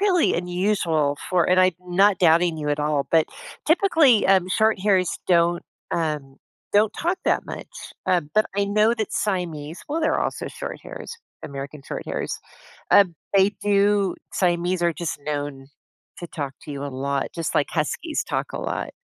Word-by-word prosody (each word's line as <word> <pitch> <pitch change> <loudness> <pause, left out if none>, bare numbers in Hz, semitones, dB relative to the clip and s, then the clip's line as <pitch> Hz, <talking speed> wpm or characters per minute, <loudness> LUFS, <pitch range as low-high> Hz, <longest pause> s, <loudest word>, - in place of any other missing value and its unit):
really 380 -4 +3
unusual 175 -5 0
for 180 -2 +3
and 185 0 +5
I'm 185 -1 +4
not 185 +2 +3
doubting 170 -1 +4
you 150 -1 -3
at 145 0 0
all, 150 -2 0
but, 160 -1 +4 0.4
typically, 320 - +4
um, 190 -1 +4
shorthairs 200 -3 +2 0.2
don't, 170 -1 +3 0.3
um 150 -5 -2 0.4
don't 210 +1 +4
talk 350 +3 -1
that - - +1
much, - - -7 0.4
um, 165 -5 +1
but 215 - +4
I 200 - +2
know 210 +3 +3
that 220 -2 -3
Siamese- 170 -6 -2
well, 310 +3 -1
they're 315 - +1
also - - -2
shorthairs, - - -7 0.3
American 140 +1 -7
Shorthairs- - - -4 0.6
um, 190 -4 +6 0.2
they 195 +1 +5
do 200 -1 +3 0.2
Siamese 175 0 +1
are 170 -1 +3
just 165 -3 -4
known 145 -2 -4 0.5
to 175 - -6
talk 145 -5 -5
to 150 - -9
you 140 0 -5
a - - -3
lot, 140 +1 -2
just 165 -2 -3
like 145 - +2
Huskies 240 - -2
talk - - -3
a - - -4
lot. - - -3
175 Hz, 160 wpm, -23 LUFS, 150-205 Hz, 0.6 s, um